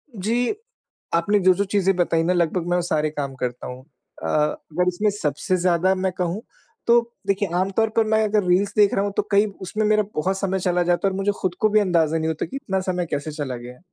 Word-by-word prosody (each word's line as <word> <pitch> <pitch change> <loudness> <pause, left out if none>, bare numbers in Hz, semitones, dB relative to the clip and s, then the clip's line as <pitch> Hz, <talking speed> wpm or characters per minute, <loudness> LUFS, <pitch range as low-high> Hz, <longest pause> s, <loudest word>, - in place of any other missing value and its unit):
जी। 230 - 0 0.6
आपने 200 +5 +2
जो-जो 185 +1 +3
चीज़ें 195 -1 +3
बताई 170 -2 +1
ना 180 +2 +2
लगभग 175 0 0
मैं 175 - +2
वो 180 - +1
सारे 155 -3 0
काम 140 -3 -4
करता 125 -1 -4
हूँ। 125 +1 -8 0.4
अ, - - -2
अगर 155 +3 0
इसमें 195 +4 +1
सबसे 185 +1 -1
ज्यादा 180 +1 +3
मैं 190 0 -1
कहूँ 180 +3 -2 0.5
तो 235 0 +7 0.3
देखिए, 195 -1 0
आम 185 +2 +1
तौर 220 +3 +1
पर 225 - +4
मैं 220 0 +3
अगर 210 -1 +2
रील्स 190 +3 +2
देख 205 -1 +5
रहा 195 - +1
हूँ 205 - -2
तो - - +3
कई 200 +1 +5 0.2
उसमें 215 +3 -2
मेरा 215 0 +3
बहुत 190 +5 0
समय 190 -1 -1
चला 180 -1 +1
जाता 175 +2 +1
है - - +1
और 190 - -4
मुझे 195 +1 +1
खुद 185 -2 0
को 215 - +3
भी 215 0 +4
अंदाज़ा 165 -5 +2
नहीं 160 0 -1
होता 160 -1 -2
कि 170 - -9
इतना 190 -8 -2
समय 180 -1 0
कैसे 145 +2 -2
चला 145 -4 -4
गया। 125 +1 -11
185 Hz, 235 wpm, -23 LUFS, 165-200 Hz, 0.6 s, तो